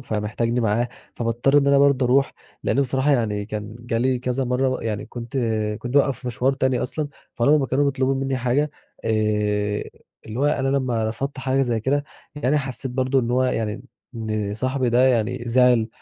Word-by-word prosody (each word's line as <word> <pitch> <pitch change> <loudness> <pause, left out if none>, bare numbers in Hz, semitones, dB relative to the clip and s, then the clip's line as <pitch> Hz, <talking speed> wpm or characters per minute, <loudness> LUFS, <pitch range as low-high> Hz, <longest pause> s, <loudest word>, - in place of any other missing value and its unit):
فمحتاجني 115 +1 -1
معاه، 115 +2 +1 0.3
فباضطر 120 +4 +2
إن 140 - +1
أنا 140 0 +5
برضه 140 -2 +4
أروح، 135 +2 +3 0.3
لأنه 140 - +2
بصراحة 130 +2 +1
يعني 105 -6 0
كان 105 0 -6
جالي 120 +2 0
كذا 125 +1 -1
مرة 125 +2 +1
ب 130 - -2
يعني، 105 -2 -3
كنت 120 +1 -7 0.4
كنت 120 +2 -5
بابقي 140 -1 +4
في 125 - -11
مشوار 125 +2 +1
تاني 130 -2 0
أصلًا، 150 +3 -3 0.3
فلما 145 +6 +4
ما 135 - 0
كانوا 135 +3 +1
بيطلبون 135 -1 +1
مني 135 0 -1
حاجة، 130 +4 +1 0.3
آآ، 115 - 0 1.2
اللي 110 +2 -6
هو - - +2
أنا 140 -2 +1
لما 125 -5 0
رفضت 135 +5 -4
حاجة 130 +1 +1
زي 120 -3 0
كده 145 +5 0 0.3
يعني، 145 +1 +1
حسيت 130 -2 -4
برضه 130 +1 +1
إن 120 -1 -2
هو 125 +1 +2
يعني 115 -4 -1 0.3
إن 110 -3 -2
صاحبي 130 0 0
ده 120 +2 +4
يعني 120 0 0
زعل، 120 -2 +4
125 Hz, 185 wpm, -23 LUFS, 115-135 Hz, 1.2 s, أنا